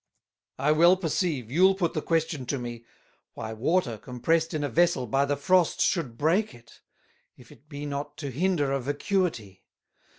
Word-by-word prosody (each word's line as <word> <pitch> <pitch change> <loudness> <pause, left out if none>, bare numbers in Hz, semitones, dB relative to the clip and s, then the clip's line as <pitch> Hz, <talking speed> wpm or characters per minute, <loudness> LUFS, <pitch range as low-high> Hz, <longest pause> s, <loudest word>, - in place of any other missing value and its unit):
"I 145 +2 +2
well 170 +4 +5
perceive 160 - -2
you'll 190 +6 +4
put 175 -4 -1
the 155 - -2
question 160 -6 -1
to 140 - -1
me, 120 -2 -7 0.5
Why 110 0 -6
Water 120 - 0
compressed 150 +8 -1
in 155 -3 -2
a - - 0
Vessel 170 -4 +2
by 135 +5 +1
the 145 0 -1
Frost 180 +3 +2
should 140 - 0
break 170 - +1
it, 120 0 -19 0.6
if - - -17
it 150 - -19
be 145 -1 -6
not 145 +1 -5
to 140 -3 -5
hinder 155 -1 0
a 135 - 0
Vacuity? 145 - -2
145 Hz, 170 wpm, -27 LUFS, 125-170 Hz, 0.6 s, well